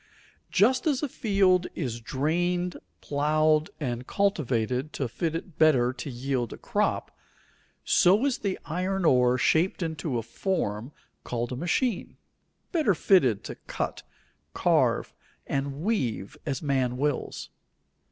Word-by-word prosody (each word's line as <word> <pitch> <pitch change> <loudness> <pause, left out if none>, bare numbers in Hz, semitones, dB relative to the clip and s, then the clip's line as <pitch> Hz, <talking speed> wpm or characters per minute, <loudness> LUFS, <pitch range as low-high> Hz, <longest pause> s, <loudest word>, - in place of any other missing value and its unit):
Just 255 - +3
as 285 -2 +1
a - - +1
field 195 -7 +2
is 120 -7 -3
drained, 175 +8 -1 0.2
plowed, 155 +1 +2
and 125 -4 -3
cultivated 135 - 0
to 135 - -2
fit 160 +7 -2
it 165 0 -7
better 130 -6 +4
to 130 +3 -6
yield 125 -1 -2
a - - -7
crop, - - -1 0.7
so 200 +9 +4
is 275 -3 0
the 200 -2 -2
iron 185 +3 -1
ore 125 -3 +4
shaped 170 +8 +2
into 160 -5 -2
a 115 - -2
form 115 - -2 0.3
called 120 0 -3
a - - -2
machine, 180 - -1 0.5
better 305 - +2
fitted 135 - +3
to - - -6
cut, - - -3 0.5
carve, - - +2 0.3
and 140 +2 -3
weave 130 - -1
as 135 -1 -2
man 130 -4 0
wills. 145 0 -2
155 Hz, 130 wpm, -27 LUFS, 125-185 Hz, 0.7 s, better